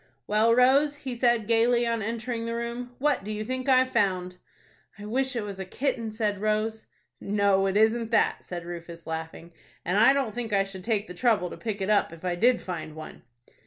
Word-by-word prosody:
"Well, 220 +2 +3
Rose," 275 +4 +4
he 265 -4 -6
said, 235 -2 +2
gayly, 235 +2 +3
on 230 -1 -1
entering 230 +2 -3
the 230 - -2
room, 240 +1 -5
"what 285 -5 +1
do 210 - -5
you 215 0 -4
think 255 +3 -3
I've 255 0 +4
found?" 185 -6 0 0.6
"I 205 - -9
wish 260 +4 -1
it 230 - -1
was 200 -2 -7
a - - -2
kitten," 230 +3 -2
said 210 -2 -2
Rose. 215 +1 -1 0.3
"No, 200 -1 +2
it 195 +1 0
isn't 220 +1 +2
that," 230 -2 +2
said 175 -1 -7
Rufus, 170 -1 -8
laughing, 160 +1 -6 0.3
"and 180 +4 +1
I 230 +4 +7
don't 270 -6 -1
think 230 -2 -4
I 195 -1 +4
should 195 -1 -9
take 215 -1 0
the 180 - -8
trouble 205 -3 +1
to - - -6
pick 215 -3 -4
it 190 - -1
up, 205 -5 +2
if 165 +2 -11
I 180 - 0
did 235 +7 +3
find 165 -4 -6
one." 155 0 -10
220 Hz, 210 wpm, -27 LUFS, 195-240 Hz, 0.6 s, I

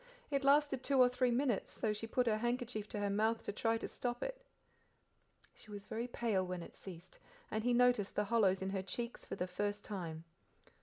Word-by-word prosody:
It 275 -1 +1
lasted 280 -1 +4
two 275 0 +1
or 250 -1 +8
three 250 0 +2
minutes, 240 -3 0
though 215 -2 +1
she 215 +2 -4
put 250 +2 +1
her 220 -2 +2
handkerchief 240 -2 -2
to - - -4
her 205 0 0
mouth 220 +3 +1
to - - -3
try 225 +2 +1
to - - -4
stop 245 0 -3
it. - - -4 1.1
She - - -17
was 205 -1 -7
very 230 +3 -3
pale 225 -6 0
when 180 -1 -4
it - - -11
ceased, 185 -1 -10 0.3
and 215 - -1
he 245 - +2
noticed 245 -4 +3
the 210 - +2
hollows 200 -4 +3
in 190 - -2
her 195 -1 -1
cheeks 235 +5 -4
for - - -4
the 180 - -1
first 205 +3 -2
time. 170 -6 -5
220 Hz, 210 wpm, -36 LUFS, 200-245 Hz, 1.1 s, or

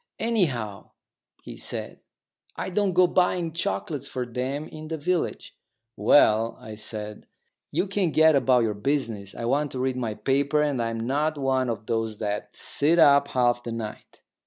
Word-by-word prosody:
"Anyhow," 135 - -1 0.5
he - - -9
said, - - -3 0.6
"I - - -4
don't 195 0 +1
go 180 +1 +6
buying 175 -2 +1
chocolates 170 -4 -3
for 130 - -3
'em 130 +5 -4
in 155 0 -9
the 160 0 -3
village." 175 +3 -2 0.4
"Well," 110 0 +4
I 110 - -9
said, 105 0 -6 0.4
"you - - 0
can 195 -2 0
get 160 0 +5
about 125 -2 +4
your 110 -2 0
business. 110 -4 -2
I 115 - -4
want 140 +4 0
to 130 - -4
read 130 0 -1
my 115 -4 -2
paper, 140 +4 +1
and 140 -5 0
I'm 115 -1 -2
not 145 +6 0
one 130 -2 0
of 110 -2 -4
those 115 -2 -2
that 105 -1 -4
sit 155 +4 +1
up 140 -3 +6
half 120 -1 +1
the 120 - -6
night." 110 -2 -8
130 Hz, 165 wpm, -25 LUFS, 115-155 Hz, 0.6 s, go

